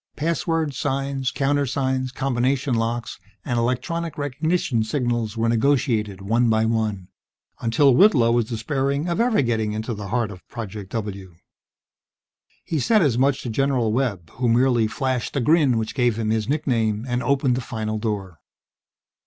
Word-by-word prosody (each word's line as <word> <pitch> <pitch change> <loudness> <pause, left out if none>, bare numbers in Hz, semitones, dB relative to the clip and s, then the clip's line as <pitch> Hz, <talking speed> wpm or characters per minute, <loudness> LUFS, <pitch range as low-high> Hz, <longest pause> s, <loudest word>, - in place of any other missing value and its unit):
Passwords, 165 -2 -1
signs, 135 -1 -1
countersigns, 135 -2 0
combination 130 +1 0
locks 115 0 -2 0.3
and 120 -1 0
electronic 130 +8 -2
recognition 145 -3 0
signals 120 -2 -1
were 115 +1 +1
negotiated 115 -5 +1
one 115 +4 +2
by 110 0 +2
one, 110 -5 -1 0.5
until 125 +4 +3
Whitlow 125 - +5
was 120 -1 +2
despairing 135 +6 -1
of 170 +5 0
ever 235 - +3
getting 110 -3 0
into 110 +2 -3
the 105 -2 -6
heart 115 0 -1
of 90 -2 -11
Project 105 -4 -7
W. 100 -5 -5 1.3
He 160 - -1
said 215 - +3
as 125 -5 +2
much 135 +1 +2
to 120 - -4
General 125 -3 +1
Webb, 105 -10 -2
who 125 -1 -1
merely 120 -1 +3
flashed 130 +2 -2
the - - +2
grin 140 -2 +3
which 110 -1 -2
gave 120 -4 +1
him 110 -1 -1
his 110 +1 -1
nickname, 115 -7 0
and 125 0 -1
opened 130 -1 +1
a - - -4
final 110 -3 -4
door. 100 -7 -4
120 Hz, 155 wpm, -23 LUFS, 110-140 Hz, 1.3 s, Whitlow